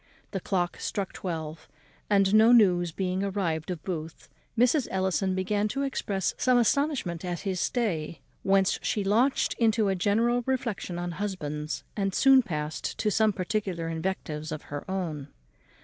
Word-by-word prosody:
The 195 Hz, -, -2 dB
clock 180 Hz, -1 st, -1 dB
struck 195 Hz, -2 st, -3 dB
twelve; 160 Hz, -3 st, -5 dB, 0.4 s
and, 195 Hz, -1 st, +3 dB
no 220 Hz, +2 st, +7 dB
news 180 Hz, -7 st, +5 dB
being 185 Hz, +2 st, -2 dB
arrived 185 Hz, -5 st, -2 dB
of 170 Hz, -5 st, -4 dB
Booth, 165 Hz, -3 st, -6 dB, 0.3 s
Mrs. 250 Hz, +3 st, +3 dB
Ellison 190 Hz, 0 st, 0 dB
began 205 Hz, +2 st, 0 dB
to 275 Hz, +6 st, -2 dB
express 200 Hz, -8 st, -1 dB
some 255 Hz, -1 st, +4 dB
astonishment 240 Hz, -, +1 dB
at 175 Hz, -1 st, -3 dB
his 190 Hz, -3 st, -2 dB
stay, 170 Hz, -, -1 dB, 0.2 s
whence 195 Hz, -1 st, +2 dB
she 210 Hz, -, -1 dB
launched 230 Hz, +8 st, +2 dB
into 220 Hz, -3 st, +3 dB
a 195 Hz, -, +1 dB
general 225 Hz, +6 st, +2 dB
reflexion 235 Hz, -9 st, -2 dB
on 175 Hz, 0 st, -3 dB
husbands, 155 Hz, -6 st, -4 dB
and 195 Hz, -2 st, -1 dB
soon 270 Hz, -1 st, +6 dB
passed 150 Hz, -7 st, -4 dB
to 210 Hz, -, 0 dB
some 220 Hz, +2 st, +3 dB
particular 185 Hz, -3 st, -2 dB
invectives 160 Hz, -2 st, -3 dB
on 155 Hz, -, -3 dB
her 145 Hz, +5 st, -7 dB
own. 165 Hz, -7 st, -3 dB
190 Hz, 150 wpm, -27 LUFS, 170-215 Hz, 0.4 s, no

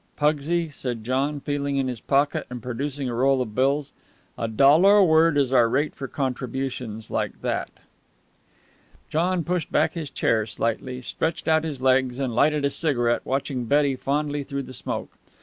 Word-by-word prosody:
"Pugsy," 155 Hz, +3 st, +1 dB
said 125 Hz, -5 st, -5 dB
John, 135 Hz, +5 st, -1 dB
feeling 140 Hz, 0 st, -2 dB
in 135 Hz, -1 st, 0 dB
his 125 Hz, -3 st, -5 dB
pocket, 140 Hz, +1 st, +1 dB
and 125 Hz, 0 st, -6 dB
producing 130 Hz, +4 st, -3 dB
a 120 Hz, -, -3 dB
roll 135 Hz, +3 st, +2 dB
of 115 Hz, -4 st, -3 dB
bills, 140 Hz, +4 st, +1 dB, 0.4 s
"a 115 Hz, -, -3 dB
dollar 150 Hz, -, +5 dB
a 200 Hz, -, +6 dB
word 160 Hz, -2 st, +4 dB
is 135 Hz, -2 st, +1 dB
our 120 Hz, -3 st, +5 dB
rate 145 Hz, +5 st, 0 dB
for 135 Hz, -, -6 dB
contributions 125 Hz, -4 st, -4 dB
like -, -, -2 dB
that." -, -, -1 dB, 1.4 s
John 175 Hz, +2 st, +1 dB
pushed 175 Hz, 0 st, -2 dB
back -, -, +2 dB
his 160 Hz, -4 st, -5 dB
chair 110 Hz, -4 st, +1 dB
slightly, 125 Hz, +4 st, -3 dB
stretched 160 Hz, +6 st, -3 dB
out 160 Hz, 0 st, +3 dB
his 145 Hz, -5 st, -5 dB
legs, 130 Hz, -1 st, +3 dB
and 135 Hz, -3 st, -2 dB
lighted 150 Hz, +3 st, +2 dB
a 140 Hz, -, +1 dB
cigarette, 120 Hz, -8 st, +1 dB
watching 135 Hz, -2 st, -2 dB
Betty 140 Hz, +2 st, +2 dB
fondly 145 Hz, +2 st, -1 dB
through 140 Hz, 0 st, -4 dB
the 130 Hz, -, -10 dB
smoke. -, -, -5 dB
135 Hz, 170 wpm, -24 LUFS, 125-150 Hz, 1.4 s, a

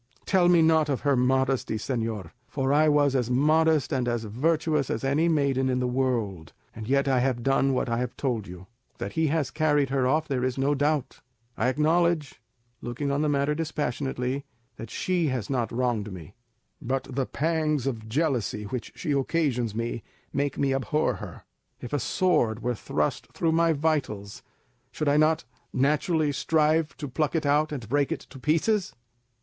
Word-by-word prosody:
"Tell 180 Hz, -3 st, +3 dB
me 170 Hz, -2 st, +5 dB
not 160 Hz, -1 st, +3 dB
of 135 Hz, -, -1 dB
her 140 Hz, -2 st, +2 dB
modesty, 130 Hz, -1 st, +1 dB
señor; 110 Hz, -6 st, -3 dB, 0.2 s
for 135 Hz, 0 st, -1 dB
I 155 Hz, +1 st, +4 dB
was 145 Hz, -2 st, +3 dB
as 125 Hz, -3 st, 0 dB
modest 155 Hz, +3 st, +3 dB
and 130 Hz, -2 st, 0 dB
as 120 Hz, -1 st, -1 dB
virtuous 150 Hz, +5 st, 0 dB
as 115 Hz, -, -2 dB
any 145 Hz, +5 st, +2 dB
maiden 140 Hz, -4 st, +1 dB
in 125 Hz, -, +1 dB
the 125 Hz, -, 0 dB
world, 115 Hz, -10 st, -1 dB, 0.2 s
and 110 Hz, -1 st, -7 dB
yet 140 Hz, +2 st, +2 dB
I 130 Hz, -2 st, +3 dB
have 125 Hz, -2 st, 0 dB
done 135 Hz, 0 st, +2 dB
what 125 Hz, -, 0 dB
I 115 Hz, 0 st, 0 dB
have 125 Hz, -1 st, -4 dB
told 120 Hz, -7 st, -2 dB
you. 90 Hz, +1 st, -10 dB, 0.3 s
That -, -, -4 dB
he 160 Hz, -1 st, +1 dB
has 145 Hz, -3 st, 0 dB
carried 150 Hz, -3 st, +1 dB
her 135 Hz, -2 st, +2 dB
off 155 Hz, +4 st, +1 dB
there 130 Hz, -3 st, -1 dB
is 130 Hz, 0 st, -1 dB
no 135 Hz, +2 st, +2 dB
doubt. 145 Hz, -1 st, 0 dB, 0.4 s
I 115 Hz, -, 0 dB
acknowledge, 155 Hz, +1 st, +1 dB, 0.4 s
looking 130 Hz, +4 st, -3 dB
on 140 Hz, +1 st, 0 dB
the 155 Hz, -, +1 dB
matter 140 Hz, +1 st, +1 dB
dispassionately, 140 Hz, -3 st, -2 dB, 0.3 s
that 115 Hz, -, -8 dB
she 180 Hz, +2 st, 0 dB
has 130 Hz, -2 st, -2 dB
not 120 Hz, -4 st, -1 dB
wronged 115 Hz, -4 st, -1 dB
me; 90 Hz, 0 st, -10 dB, 0.5 s
but 130 Hz, +2 st, -1 dB
the 135 Hz, -1 st, -3 dB
pangs 155 Hz, -3 st, 0 dB
of 110 Hz, -5 st, -3 dB
jealousy 125 Hz, -6 st, 0 dB
which 120 Hz, +3 st, -5 dB
she 150 Hz, -, -3 dB
occasions 135 Hz, -5 st, 0 dB
me 115 Hz, 0 st, -3 dB, 0.3 s
make 140 Hz, -1 st, -1 dB
me 135 Hz, -1 st, +1 dB
abhor 135 Hz, +4 st, 0 dB
her. -, -, -9 dB, 0.4 s
If 125 Hz, -, -8 dB
a 145 Hz, -, +1 dB
sword 120 Hz, -8 st, +1 dB
were 125 Hz, 0 st, 0 dB
thrust 75 Hz, -8 st, -2 dB
through 165 Hz, -, +1 dB
my 165 Hz, 0 st, +3 dB
vitals, 140 Hz, -10 st, -1 dB, 0.5 s
should 155 Hz, -, -3 dB
I 145 Hz, +1 st, +4 dB
not 155 Hz, +1 st, +3 dB, 0.3 s
naturally 150 Hz, +3 st, +1 dB
strive 155 Hz, +1 st, +1 dB
to 145 Hz, -, -5 dB
pluck 150 Hz, +4 st, -1 dB
it 160 Hz, -2 st, 0 dB
out 150 Hz, +2 st, +2 dB
and 130 Hz, -7 st, -5 dB
break 140 Hz, +4 st, +1 dB
it -, -, -2 dB
to 135 Hz, -, -10 dB
pieces?" 180 Hz, -, +1 dB
135 Hz, 180 wpm, -26 LUFS, 125-155 Hz, 0.5 s, me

